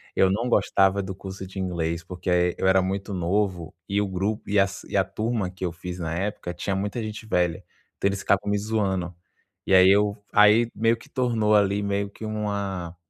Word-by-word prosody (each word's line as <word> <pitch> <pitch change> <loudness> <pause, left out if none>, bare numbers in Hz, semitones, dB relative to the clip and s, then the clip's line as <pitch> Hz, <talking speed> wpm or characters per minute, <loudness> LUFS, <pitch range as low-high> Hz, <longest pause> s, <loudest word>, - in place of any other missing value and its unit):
eu 95 - +4
não 115 +6 0
gostava 95 -3 +3
do 95 0 -6
curso 95 0 -8
de 95 +1 -12
inglês, 85 -2 -2
porque 90 +1 -6 0.3
eu 95 - 0
era 95 0 +5
muito 95 +2 -3
novo 90 -1 -1 0.2
e 100 +1 +1
o 100 - -1
grupo 95 +3 -2
e 100 -1 +3
as 95 0 0
e - - -7
a - - +4
turma, 110 -4 -2
que 95 0 -6
eu 85 - -1
fiz 90 +1 -7
na 80 -1 -3
época, 95 -1 -3
tinha 95 +3 -3
muita 105 +4 -2
gente 110 +1 -6
velha, 90 -5 0 0.3
então - - +1
eles 100 - -3
ficavam 100 0 +1
me 105 - +2
zoando. 95 -4 -1 0.5
E - - +1
aí 95 0 +8
eu 105 +1 +3
aí 105 +3 +6
meio 115 +2 +2
que 145 +5 -17
tornou 115 -5 +1
ali 100 0 +3
meio 100 0 -1
que 110 - -9
uma 100 -5 -3
100 Hz, 205 wpm, -25 LUFS, 95-105 Hz, 0.5 s, aí